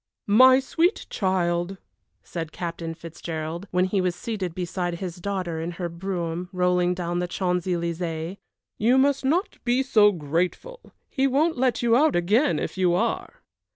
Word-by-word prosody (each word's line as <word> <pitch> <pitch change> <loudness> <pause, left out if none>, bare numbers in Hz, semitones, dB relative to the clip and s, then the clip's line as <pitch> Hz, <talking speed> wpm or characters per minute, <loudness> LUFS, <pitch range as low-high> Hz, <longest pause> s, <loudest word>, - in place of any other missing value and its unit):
"My 255 +5 +7
sweet 330 - 0
child," 180 -1 0 0.5
said 165 -2 -5
Captain 165 -1 -5
Fitzgerald, 165 +2 -6
when 180 0 +2
he 190 +1 0
was 180 -1 0
seated 195 -8 -4
beside 175 -1 -2
his 175 -1 -6
daughter 180 -3 -3
in 170 +2 -4
her 175 0 -4
brougham, 175 0 -4
rolling 180 -1 +2
down 175 -1 -2
the 180 - -1
Champs 180 0 -1
Elysées, 170 0 -2 0.4
"you 240 +5 +4
must 275 +1 +3
not 330 +9 0
be 250 +2 +2
so 215 -5 +5
grateful; 180 - -3 0.2
he 270 -1 +1
won't 305 +5 +2
let 250 -2 +1
you 235 -1 +4
out 300 +4 +4
again 210 - +2
if - - -4
you 180 -2 +3
are." 180 - -2
180 Hz, 155 wpm, -25 LUFS, 170-230 Hz, 0.5 s, My